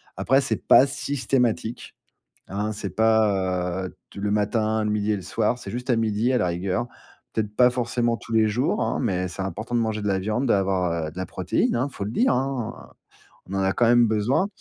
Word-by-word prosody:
après, 135 - +3
c'est 135 - -2
pas 135 - +7
systématique, 125 -4 -1 0.6
hein. 105 +3 -2
C'est 105 -2 -5
pas, 95 -5 +1
heu, - - -11
t - - -9
le 105 0 -1
matin, 110 +1 +1
le 105 - 0
midi 105 0 0
et - - +1
le 95 - -7
soir. 120 - 0
C'est - - -8
juste 125 +2 -5
à 120 - +3
midi, 110 +2 +1
à 125 - +3
la - - +1
rigueur. 90 +7 -1 0.5
Peut-être 105 -2 -2
pas 125 0 +6
forcément 120 -1 0
tous - - -10
les 110 -1 +4
jours, 120 +5 0
hein, - - -1
mais 90 0 0
c'est 90 +2 -5
important 110 +5 -5
de 120 - +3
manger 110 -2 -1
de 105 - -1
la 95 -1 +1
viande, 110 +7 -1
d'avoir, 95 -6 +1
heu, - - -6
de 85 - -19
la 95 - -3
protéine, - - 0
hein. 130 +4 0
Il - - -19
faut 100 - -4
le 105 - -4
dire, 245 - +3
hein. 130 -2 -3 0.6
On 100 - -4
en 95 - 0
a 95 0 +1
quand 120 - +2
même 120 0 +5
besoin 110 - +1
110 Hz, 225 wpm, -24 LUFS, 100-120 Hz, 0.6 s, pas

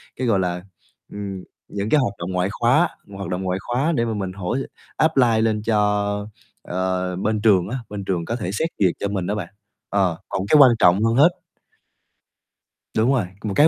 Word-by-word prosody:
cái, 130 - -2
gọi 100 -4 +3
là, 90 -1 -1 0.5
ừm, 100 -2 -6 0.2
những 100 +1 -4
cái 155 - +4
hoạt 120 -7 0
động 85 +2 -4
ngoại 90 +1 0
khóa 125 +10 +3 0.3
hoạt 100 - -5
động 90 +1 -2
ngoại 95 0 -1
khóa 130 +9 0
để 120 -2 +1
mà 115 - -2
mình 95 -3 -3
hỗ 95 +3 -3 0.4
apply 125 -8 +3
lên 110 -1 +1
cho, 110 -2 +2 0.8
ờ, 90 0 -2
bên 105 +3 -1
trường 100 -4 +4
á, 130 - -2
bên 105 -1 -5
trường 90 -3 -1
có 115 - -2
thể 105 -7 -4
xét 160 +10 0
duyệt 95 -3 +4
cho 100 - -1
mình 95 -3 -2
đó 105 - -1
bạn, 95 -5 -5 0.4
ờ, 95 -4 +1
còn - - -2
cái 155 - +6
quan 135 -4 +8
trọng 90 +3 +5
hơn 115 +1 +2
hết 145 +6 +7 1.7
Đúng 115 +4 +3
rồi, 125 -8 +1 0.2
một 105 -2 -2
cái 150 - +7
105 Hz, 200 wpm, -22 LUFS, 95-115 Hz, 1.7 s, quan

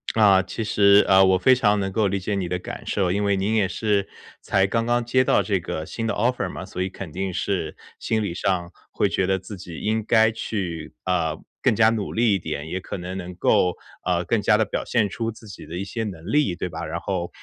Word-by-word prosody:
啊， 100 -4 +6
其 110 +3 -5
实， 100 -1 +5
呃， 95 0 +6
我 95 0 +4
非 130 +8 +5
常 105 -5 +3
能 95 0 -2
够 105 0 +1
理 100 +1 0
解 100 +3 -3
你 95 -3 -1
的 90 +1 -1
感 - - -8
受。 95 -3 +1
因 100 +2 0
为 100 -1 +2
您 100 +3 0
也 100 -3 +3
是 100 +1 0 0.3
才 95 0 +2
刚 115 +3 0
刚 120 0 +1
接 130 +2 +2
到 100 - +3
这 100 -1 0
个 80 -1 -5
新 115 -1 -4
的 - - 0
offer 120 +4 0
嘛， - - -7
所 90 - -6
以 95 - -1
肯 95 -4 -8
定 95 +2 -3
是 85 -6 -2 0.2
心 110 -1 0
理 85 - -2
上 90 -1 -1 0.2
会 - - +1
觉 95 - 0
得 95 0 +2
自 95 +2 -9
己 85 -2 -9
应 110 +1 0
该 110 -1 +4
去， 90 -8 -4
啊， 85 -4 0 0.3
更 - - +3
加 110 +1 +5
努 110 -3 -2
力 115 -2 +3
一 95 - +1
点， 80 -2 -5
也 95 - -2
可 95 - -6
能 90 +2 -6
能 90 -1 -7
够， 90 0 +2 0.3
呃， - - +1
更 - - 0
加 - - +4
地 - - +3
表 - - -3
现 110 -5 +1
出 115 +3 -3
自 110 +1 -15
己 100 - -10
的 85 - -8
一 95 - -2
些 110 +3 -4
能 90 -1 -6
力， 145 -12 +2
对 90 - -4
吧？ 85 - -5
然 85 +2 -4
后， 90 -3 -2
95 Hz, 280 characters per minute, -23 LUFS, 90-110 Hz, 0.3 s, 啊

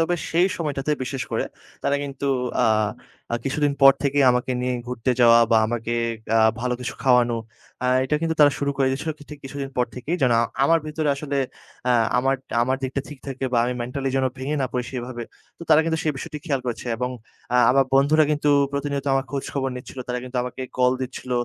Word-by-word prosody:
তবে 165 +2 +2 0.2
সেই 175 +3 +4
সময়টাতে 150 -3 -2
বিশেষ 130 0 -3
করে - - 0 0.4
তারা 140 0 +1
কিন্তু 140 -1 -5 0.4
আ - - +4 0.7
আ - - +2
কিছুদিন 145 +1 +1
পর 135 0 +10
থেকেই 140 -1 +3
আমাকে 125 +1 0
নিয়ে 125 0 -1
ঘুরতে 125 0 -2
যাওয়া 115 -1 +7
বা 115 - +5
আমাকে 115 0 -3 0.4
আ - - +5 0.2
ভালো 125 0 0
কিছু 125 - -4
খাওয়ানো, 125 -3 +4 0.5
আ - - +2 0.2
এটা 130 - -1
কিন্তু 165 0 0
তারা 145 -1 +7
শুরু 140 0 0
করে 135 -1 +2
দিছিল 140 +4 -4
কি - - -13
ঠিক 150 - -8
কিছুদিন 135 0 -5
পর 125 -1 +2
থেকেই। 145 +8 -3
যেন 125 -2 +4 0.3
আমার 165 +4 +4
ভেতরে 155 0 -2
আসলে 140 0 -4 0.5
আ - - +5 0.3
আমার 135 +2 +2 0.3
আমার 130 +2 +1
দিকটা 130 +1 -2
ঠিক 145 -3 -10
থাকে 135 -1 -4
বা 120 - +3
আমি 125 +1 -1
mentally 135 +3 -3
যেন 135 - +2
ভেঙে 135 +3 -2
না - - +1
পড়ি 125 -1 -1
সেভাবে। 120 -1 -5 0.4
তো - - -10
তারা 155 0 +7
কিন্তু 160 0 0
সেই 155 - +1
বিষয়টি 150 +2 -6
খেয়াল 140 -5 0
করেছে 120 0 -4
এবং 125 +2 -2 0.4
আ - - +5
আমার 135 +1 +4
বন্ধুরা 150 +3 +5
কিন্তু 150 0 +1 0.2
প্রতিনিয়ত 140 -1 -2
আমার 135 0 +1
খোঁজখবর 135 -1 -2
নিচ্ছিল। 125 +1 -9
তারা 125 0 -1
কিন্তু 125 0 -7
আমাকে 125 +1 -5
call 125 0 +4
দিচ্ছিল। 130 0 -7
135 Hz, 205 wpm, -23 LUFS, 125-145 Hz, 0.7 s, পর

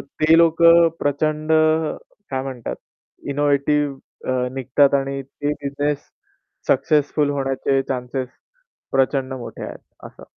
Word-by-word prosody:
ते 155 +3 +2
लोकं 170 0 +6
प्रचंड 155 +2 0 0.8
काय 130 -1 -2
म्हणतात 130 -4 -5 0.5
इनोव्हेटिव्ह 145 0 +1 0.3
अ, 125 0 0
निघतात 135 +2 +2
आणि 135 0 -1
ते 145 +2 -4
बिझनेस 145 +1 -1 0.7
सक्सेसफुल 145 +1 +2
होण्याचे 135 -1 0
चान्स 125 -1 -4 0.8
प्रचंड 135 0 +1
मोठे 125 - -8
आहेत - - -8 0.3
असं. - - -14
140 Hz, 105 wpm, -21 LUFS, 135-150 Hz, 0.8 s, लोकं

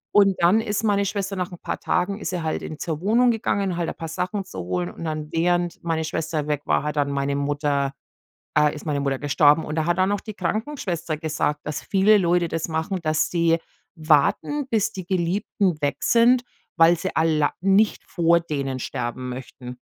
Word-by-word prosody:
Und 195 -2 +5
dann 190 +6 +5
ist 215 -1 -2
meine 200 -2 +2
Schwester 195 0 -2
nach 180 -1 -3
'n 175 - -10
paar - - -4
Tagen 195 +3 -1
ist - - -4
sie 175 -3 -3
halt 155 - -2
in 155 - -7
zur 160 -3 -3
Wohnung 235 +5 +4
gegangen, 200 -5 -1
halt 170 -1 -1
ein - - -6
paar 165 - -6
Sachen 185 +4 -3
zu 95 - -8
holen 90 0 -2
und - - -9
dann 155 -1 -4
während 175 +2 0
meine 165 -1 -1
Schwester 155 -1 -2
weg 145 -1 -1
war, - - +1
hat 150 0 -3
dann 140 -1 +1
meine 140 0 -1
Mutter 140 -1 0 0.6
äh, 150 0 +4
ist 150 - -9
meine 145 -2 -1
Mutter 135 -1 -1
gestorben. 145 +2 +4
Und 150 - -4
da 160 - +1
hat 175 +1 +1
dann 190 +2 +2
auch 205 - -2
die 215 - -8
Krankenschwester 185 - -3
gesagt, 150 -1 -1
dass 150 -1 -4
viele 205 +2 +4
Leute 175 -2 +2
das 165 0 -2
machen, 160 +4 -2
dass 155 -1 +1
sie 165 -1 +3 0.4
warten, 160 - +2
bis 220 -1 +1
die 185 -2 -6
Geliebten 185 0 0
weg 140 0 0
sind, 240 +2 +4 0.3
weil 165 +1 +6
sie 190 +3 -4
alla 155 -2 +2
nicht 195 +3 +3
vor 170 -1 +3
denen 140 -5 -3
sterben 120 +1 -4
möchten. 125 0 -8
165 Hz, 200 wpm, -23 LUFS, 150-195 Hz, 0.6 s, weil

